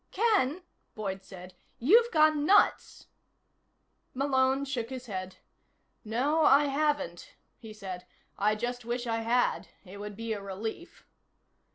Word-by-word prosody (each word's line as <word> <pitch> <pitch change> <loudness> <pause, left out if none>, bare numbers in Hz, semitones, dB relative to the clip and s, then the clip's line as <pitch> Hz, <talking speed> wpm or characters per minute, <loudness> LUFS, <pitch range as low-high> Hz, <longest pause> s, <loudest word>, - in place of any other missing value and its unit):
"Ken," 375 - +1 0.3
Boyd 195 -3 -4
said, 185 -1 -11 0.2
"you've 455 - +5
gone 310 -2 +4
nuts." 400 +7 +3 1.1
Malone 265 0 +1
shook 245 -4 -3
his 260 -1 -7
head. 185 -4 -6 0.7
"No, 260 +8 0
I 290 0 +6
haven't," 285 - -2 0.2
he 220 -2 -10
said. 185 -4 -8 0.3
"I 210 +1 +1
just 245 +2 -4
wish 240 +1 -3
I 225 -1 -1
had. 230 +2 0 0.2
It 190 +2 -11
would 205 0 -7
be 225 +1 -3
a 205 - -5
relief." 215 - -7
240 Hz, 130 wpm, -29 LUFS, 210-290 Hz, 1.1 s, I